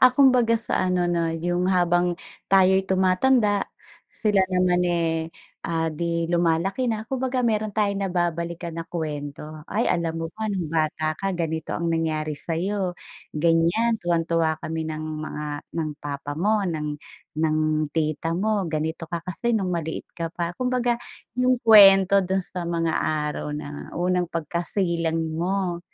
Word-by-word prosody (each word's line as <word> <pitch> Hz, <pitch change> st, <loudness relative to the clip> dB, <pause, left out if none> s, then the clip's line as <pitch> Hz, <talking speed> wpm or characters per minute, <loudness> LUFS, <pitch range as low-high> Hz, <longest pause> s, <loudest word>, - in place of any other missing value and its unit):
Ah, 255 Hz, -, +9 dB
kumbaga 250 Hz, -4 st, +5 dB
sa 220 Hz, -, -1 dB
ano 180 Hz, -1 st, +1 dB
na 170 Hz, -1 st, +1 dB
yung 175 Hz, +2 st, -1 dB
habang 175 Hz, -1 st, +2 dB, 0.4 s
tayo'y 190 Hz, 0 st, +5 dB
tumatanda 200 Hz, +3 st, +3 dB, 0.5 s
sila 205 Hz, -3 st, +2 dB
naman, 180 Hz, -1 st, +2 dB
eh, 165 Hz, -2 st, 0 dB, 0.3 s
ah, 165 Hz, -1 st, 0 dB
di 170 Hz, +1 st, -1 dB
lumalaki 175 Hz, +7 st, +1 dB
na 220 Hz, 0 st, -3 dB
kumbaga 260 Hz, -1 st, -1 dB
mayro'n 215 Hz, -1 st, 0 dB
tayong 200 Hz, -1 st, 0 dB
nababalikan 170 Hz, -1 st, -2 dB
na 165 Hz, -, -4 dB
kuwento. 150 Hz, -2 st, -5 dB
"Ay, 220 Hz, +5 st, +1 dB
alam 165 Hz, -1 st, 0 dB
mo 165 Hz, -, -2 dB
ba 220 Hz, -, -5 dB
nung 180 Hz, -5 st, -2 dB
bata 155 Hz, 0 st, 0 dB
ka 195 Hz, +2 st, -2 dB
ganito 160 Hz, -2 st, -3 dB
ang 170 Hz, -, -2 dB
nangyari 155 Hz, -2 st, -1 dB
sayo, 180 Hz, +4 st, -2 dB, 0.4 s
ganyan 170 Hz, +9 st, +2 dB
tuwang-tuwa 165 Hz, -2 st, +1 dB
kami 160 Hz, 0 st, -3 dB
ng 155 Hz, -, -4 dB, 0.2 s
mga 150 Hz, -1 st, -5 dB, 0.4 s
ng 155 Hz, -1 st, -2 dB
papa 145 Hz, 0 st, -5 dB
mo, 210 Hz, +6 st, +2 dB
ng 155 Hz, -3 st, -2 dB, 0.5 s
ng 155 Hz, -1 st, +2 dB, 0.4 s
tita 160 Hz, +1 st, -1 dB
mo 205 Hz, 0 st, 0 dB
ganito 160 Hz, +1 st, -3 dB
ka 170 Hz, -1 st, -4 dB
kasi 230 Hz, +6 st, -1 dB
nung 190 Hz, -3 st, -1 dB
maliit 165 Hz, -2 st, -3 dB
ka 165 Hz, -1 st, -4 dB
pa." 170 Hz, -1 st, -2 dB
Kumbaga 250 Hz, -1 st, +1 dB, 0.4 s
yung 255 Hz, 0 st, +4 dB
kuwento 195 Hz, -3 st, +8 dB
do'n 190 Hz, +1 st, 0 dB
sa 180 Hz, -1 st, -6 dB
mga 165 Hz, -1 st, 0 dB
araw 150 Hz, -1 st, -2 dB
na 145 Hz, -1 st, -7 dB
unang 180 Hz, 0 st, +1 dB
pagkasilang 170 Hz, 0 st, -1 dB, 0.2 s
mo 180 Hz, -1 st, -1 dB
175 Hz, 145 wpm, -24 LUFS, 160-195 Hz, 0.5 s, Ah